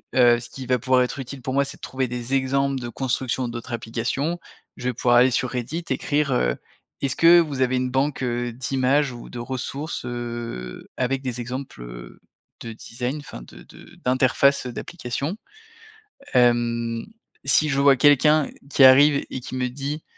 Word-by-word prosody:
Heu, 120 -2 +5
ce 120 0 -9
qui 130 +2 -8
va 125 -1 +2
pouvoir 130 +2 +3
être 125 +2 -4
utile 135 +1 -7
pour 130 +1 -4
moi 140 +1 +2
c'est - - -8
de - - -36
trouver 130 0 -2
des 125 +1 -5
exemples 135 0 +1
de 120 - -5
construction 130 0 -2
d'autres 120 +1 -7
applications. 125 +8 -2 0.4
Je 125 - -8
vais - - -2
pouvoir 120 +1 +3
aller 125 +2 +5
sur 125 +1 0
Reddit 130 +7 -3
écrire, 145 +2 0
heu: - - +1 0.5
«Est-ce 135 -1 -1
que 170 +1 +7
vous 145 -5 -3
avez 130 0 +2
une 125 0 -1
banque, 135 +1 0
heu, 120 -1 -2
d'images 135 +3 +1
ou 120 - -10
de 120 - -7
ressources, 130 +5 -4
heu, 120 - -6
avec 130 +1 0
des 125 -2 -3
exemples, 130 - -6
heu, - - -10 0.4
de 115 - -6
design, 125 +5 -5
enfin 145 - -10
de - - -14
de - - -16
d'interface, 130 +2 +3
heu, - - -5
d'applications?» 140 +3 -4 1.0
Hem, 120 -2 +2 0.4
si 150 +3 +3
je 140 0 +1
vois 140 -1 +6
quelqu'un 145 +2 +4 0.2
qui 140 - +5
arrive 140 +2 +7
et 130 - -4
qui 130 +1 -7
me 125 -1 0
dit: 140 +4 -5
130 Hz, 180 wpm, -23 LUFS, 120-140 Hz, 1.0 s, que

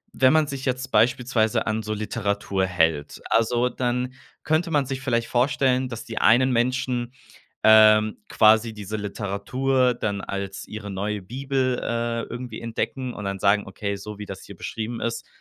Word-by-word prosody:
wenn 130 +1 +5
man 155 -1 +4
sich 140 -2 -5
jetzt 130 0 -2
beispielsweise 120 -2 +2
an 110 +1 0
so 110 - -3
Literatur 100 -2 -1
hält, 80 -5 0
also, 120 +2 +2
dann 125 +1 -2 0.3
könnte 160 +3 +1
man 145 -3 +2
sich 135 0 -4
vielleicht 115 -2 0
vorstellen, 130 0 +1
dass 115 -2 -7
die 115 - -4
einen 130 +3 +5
Menschen, 125 0 0 0.5
ähm, 110 0 +6
quasi 110 +1 +4
diese 105 0 -5
Literatur 120 +6 0
dann 100 -4 -2
als 100 0 -5
ihre 105 -1 -7
neue 100 +2 -3
Bibel, 130 +3 -1
äh, 115 0 -1
irgendwie 120 -2 -7
entdecken 125 +2 -3
und 105 - -7
dann 100 0 -3
sagen: 100 +2 +3
„Okay, 100 +1 -4
so 105 +1 -9
wie 105 - -5
das 95 -1 -8
hier 100 - -11
beschrieben 115 +5 -5
ist, 115 0 -3
115 Hz, 165 wpm, -24 LUFS, 105-125 Hz, 0.5 s, ähm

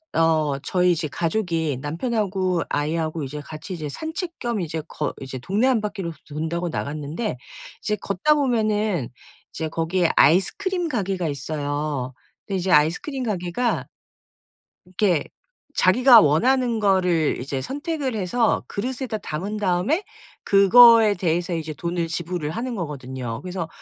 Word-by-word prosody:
어 155 -4 +2
저희 180 +4 +2
집 155 -2 -3
가족이 165 -3 -1
남편하고 185 - -1
아이하고 155 +1 -1
이제 150 +2 -6
같이 155 +5 -8
이제 155 -4 -5
산책 325 - -5
겸 235 -4 -2
이제 160 -1 -3
걷 150 - -3
이제 130 -1 -6
동네 200 - +1
한 250 -4 +2
바퀴를 200 -5 -4 0.2
돈다고 160 +4 -3
나갔는데 150 - -4 0.4
이제 210 - 0
걷다 205 +8 +1
보면은 215 - 0 0.4
이제 160 - -3
거기에 165 +2 0
아이스크림 355 - +3
가게가 195 - -1
있어요. 145 -2 -3 0.3
근데 195 - -2
이제 185 0 -1
아이스크림 175 - +2
가게가 210 +2 -1 1.0
이렇게 180 -3 +1 0.5
자기가 240 +5 +7
원하는 235 - +2
거를 180 -6 +2
이제 135 +1 -3
선택을 285 - -3
해서 220 +4 +1
그릇에다 245 +1 -3
담은 195 +3 -4
다음에 205 - +1 0.4
그거에 220 +2 +7
대해서 175 -1 -1
이제 160 -1 -4
돈을 170 +2 -2
지불을 170 -2 -3
하는 240 +8 -3
거거든요. 130 - -5
그래서 180 -2 -4
180 Hz, 320 characters per minute, -23 LUFS, 155-220 Hz, 1.0 s, 자기가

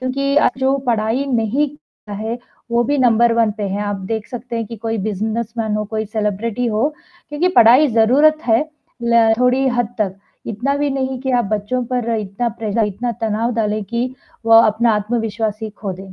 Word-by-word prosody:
क्योंकि 275 +2 -1
आज 295 - +5
जो 265 +1 +2
पढ़ाई 230 +3 +1
नहीं 250 +3 +1
करता 285 -7 -16
है 230 +2 -3 0.3
वो 235 0 +3
भी 285 +3 0
नंबर 235 -1 +4
1 230 -2 +2
पे 210 - -5
है, 200 +2 -3
आप 205 -1 -2
देख 220 -1 -3
सकते 240 -1 -6
हैं 225 -2 -2
कि 230 - -8
कोई 225 +1 -3
बिज़नेस 215 +3 -2
मैन 220 -2 -1
हो, 210 - -2
कोई 220 +1 -3
सेलिब्रिटी 215 +2 -2
हो 225 +6 +1 0.4
क्योंकि 295 +5 0
पढ़ाई 245 +6 +7
ज़रूरत 275 +8 +4
है 225 -1 +4 0.4
ल 235 -1 +4
थोड़ी 255 +2 +3
हद 245 -2 -1
तक, 195 -3 -1 0.3
इतना 245 +6 -1
भी 290 0 0
नहीं 265 -1 -2
कि 265 -1 -2
आप - - -2
बच्चों 230 +5 -1
पर 240 -2 -1
इतना 210 +3 -2
प्रेश 215 -1 -3
इतना 235 +5 -3
तनाव 225 +2 0
डालें 215 -1 0
कि 235 +5 -2 0.4
वो 225 0 +8
अपना 220 +1 +3
आत्मविश्वास 215 0 -2
ही 220 - -4
खो 200 -2 -6
दें, 190 +1 -10
230 Hz, 195 wpm, -18 LUFS, 215-250 Hz, 0.4 s, वो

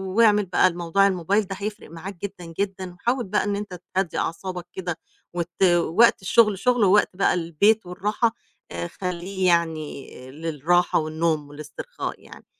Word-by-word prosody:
واعمل 210 -3 +5
بقى 180 - +4
الموضوع 175 +3 +2
الmobile 195 +3 +1
ده 195 - -4
هيفرق 210 -2 -5
معاك 180 +4 -7
جدًا، 180 -4 -7
جدًا 190 -2 -3
وحاول 240 +7 -1
بقى 190 - 0
إن 205 -1 -1
أنت 200 -3 -6 0.2
تهدّي 190 -4 0
أعصابك 180 +1 -3
كده 175 -3 -4 0.4
وت 175 +1 -2 0.2
وقت 220 +5 +4
الشُغل 210 0 +3
شُغل 245 -2 +2
ووقت 200 +2 +5
بقى 195 - +3
البيت 180 +5 +2
والراحة 210 +6 0 0.4
آآ 85 0 -4
خلّيه 185 - -3
يعني 160 -4 0 0.2
للراحة 165 +3 +1
والنوم 155 -1 -1
والاسترخاء 150 0 -7
يعني. - - -14
180 Hz, 150 wpm, -24 LUFS, 165-200 Hz, 0.4 s, واعمل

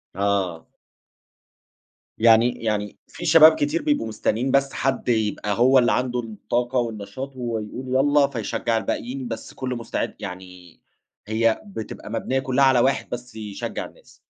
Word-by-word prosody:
آه. 95 -4 -1 1.5
يعني 115 +1 +4
يعني 105 -2 -2
في - - -8
شباب 160 0 +8
كتير 150 +3 0
بيبقوا 145 -6 0
مستنّين 115 +3 -1
بس 135 0 +2
حد 135 -2 -1
يبقى 105 -2 0
هو 130 +2 +6
اللي 120 - +3
عنده 125 -1 0
الطاقة 120 +3 -2
والنشاط 120 +4 -5
وهو 120 -3 -3
يقول 125 +5 -5
يالّا 145 +1 +4
فيشجع 115 -2 -2
الباقيين 125 +3 -3
بس 115 - -7
كُلّه 130 -1 -4
مستعد 115 -1 -3
يعني 90 -1 -9 0.5
هي 110 +1 +1
بتبقى 150 - -8
مبنيّة 130 +3 -1
كُلّها 135 0 +2
على 130 -2 +5
واحد 135 +3 +1
بس 125 -1 -7
يشجّع 105 -3 -5
الناس. - - -17
120 Hz, 145 wpm, -23 LUFS, 110-130 Hz, 1.5 s, شباب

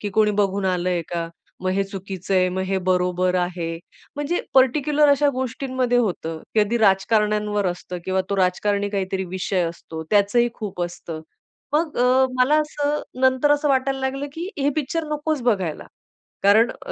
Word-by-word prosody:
की 205 - -3
कोणी 215 -1 +4
बघून 195 0 0
आलं 185 -1 0
आहे 175 -2 0
का. 170 -1 -2 0.3
मग 185 - 0
हे 195 - +1
चुकीचं 195 -1 -5
आहे, 185 -1 +4
मग 190 - 0
हे 195 0 +1
बरोबर 180 0 +1
आहे. 175 -2 -2 0.4
म्हणजे 290 +4 -1
पर्टिकुलर 290 +3 +4
अशा 285 +1 +4
गोष्टींमध्ये 255 -1 -1
होतं. 170 -8 -1 0.2
कधी 215 +3 +2
राजकारण्यांवर 210 0 +2
असतं 180 0 -4
किंवा 190 0 0
तो 200 - 0
राजकारणी 200 +2 +1
काहीतरी 190 -1 -2
विषय 185 0 -1
असतो, 160 -1 -8
त्याचंही 210 +4 +3
खूप 200 -5 -5
असतं. 170 -2 -6 0.5
मग 305 +1 0
अ, 255 +2 +4
मला 275 +4 +4
असं 295 -1 -1 0.2
नंतर 260 +2 +3
असं 295 0 +1
वाटायला 270 0 +1
लागलं, 270 +2 -2
की 335 +4 -5
हे 280 0 +2
पिक्चर 310 +2 -1
नकोच 300 -2 -1
बघायला, 190 -10 -1 0.6
कारण 215 +4 +5 0.2
अ, - - -5
210 Hz, 165 wpm, -22 LUFS, 185-265 Hz, 0.6 s, कारण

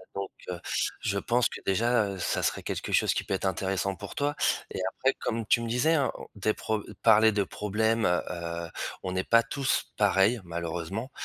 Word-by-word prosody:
donc, 100 -1 -4 0.2
heu, 90 -1 -4 0.4
je 100 -1 -1
pense 120 +3 +2
que - - -8
déjà, 115 +3 +2
heu, 100 -1 -5
ça 90 - -1
serait - - -1
quelque - - -4
chose - - +3
qui - - -1
peut 95 - -1
être 95 - -3
intéressant 95 +1 -1
pour 100 0 -9
toi. 145 +1 0 0.4
Et - - -4
après, - - +1
comme 115 -1 -2
tu 115 - +3
me 115 - -3
disais, 130 +8 +3
hein, 140 -5 +2
o - - -9
des 105 +1 0
pro 110 -1 -2 0.2
parler 110 0 +7
de 100 -1 +1
problème, 110 +3 0
heu 90 0 +2
heu, 85 -1 -4 0.4
on 95 - -2
n'est 95 0 0
pas 115 0 +5
tous 135 -2 -1
pareils 100 +2 +3
malheureusement, 85 - -4
105 Hz, 205 wpm, -28 LUFS, 95-115 Hz, 0.4 s, parler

